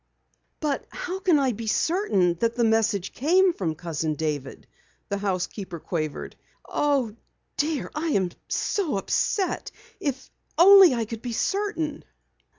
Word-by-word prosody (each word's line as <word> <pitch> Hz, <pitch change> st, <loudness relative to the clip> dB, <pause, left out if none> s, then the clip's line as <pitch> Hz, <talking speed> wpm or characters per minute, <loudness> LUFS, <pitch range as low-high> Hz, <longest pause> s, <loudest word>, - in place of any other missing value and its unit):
"But 295 Hz, -3 st, -2 dB
how 370 Hz, +1 st, -5 dB
can 360 Hz, -5 st, +3 dB
I 270 Hz, -3 st, +2 dB
be 225 Hz, 0 st, -6 dB
certain 215 Hz, -, +2 dB
that 230 Hz, +2 st, 0 dB
the 240 Hz, -, +1 dB
message 220 Hz, -4 st, +1 dB
came 360 Hz, +6 st, +3 dB
from 165 Hz, -, -2 dB
Cousin 160 Hz, -2 st, -3 dB
David?" 145 Hz, -3 st, -4 dB, 0.4 s
the 200 Hz, -, -2 dB
housekeeper 190 Hz, -2 st, -3 dB
quavered. 155 Hz, -3 st, -4 dB, 0.3 s
"Oh, 275 Hz, -7 st, 0 dB, 0.4 s
dear, 300 Hz, -1 st, -1 dB
I 310 Hz, +2 st, -2 dB
am 190 Hz, -, +1 dB, 0.2 s
so 335 Hz, -, -1 dB
upset! 375 Hz, -, -1 dB, 0.3 s
If 270 Hz, -2 st, -4 dB, 0.3 s
only 380 Hz, -4 st, +8 dB
I 230 Hz, -1 st, -1 dB
could 225 Hz, 0 st, -7 dB
be 240 Hz, -1 st, -4 dB
certain." 330 Hz, -, -2 dB
235 Hz, 135 wpm, -25 LUFS, -, 0.4 s, only